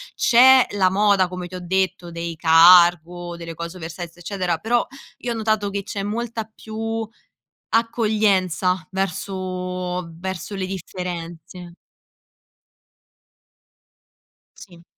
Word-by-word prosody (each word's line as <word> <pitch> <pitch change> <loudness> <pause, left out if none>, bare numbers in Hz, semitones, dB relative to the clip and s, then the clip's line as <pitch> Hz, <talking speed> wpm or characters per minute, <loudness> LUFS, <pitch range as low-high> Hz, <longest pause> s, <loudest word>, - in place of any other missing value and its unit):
C'è 260 +1 +6
la 185 -2 +2
moda 200 -1 +3
come 180 0 -6
ti 185 - -10
ho - - -5
detto 180 -1 -1
dei 170 0 -5
cargo, 175 +1 +5
delle 165 -1 -8
cose 170 +2 -7
oversize, 170 0 -8
eccetera, 175 -2 -2
però 235 +2 +1 0.3
io 245 - -4
ho - - -2
notato 215 -2 0
che 200 0 -2
c'è 200 -1 -5
molta 225 +2 -3
più 225 +1 -5 0.6
accoglienza 205 -6 +1
verso, 185 -1 -3
verso 185 +2 -6
le 190 -1 -3
differenze. 175 -1 -7 2.8
Sì. 175 -3 -15
185 Hz, 110 wpm, -22 LUFS, 175-210 Hz, 2.8 s, C'è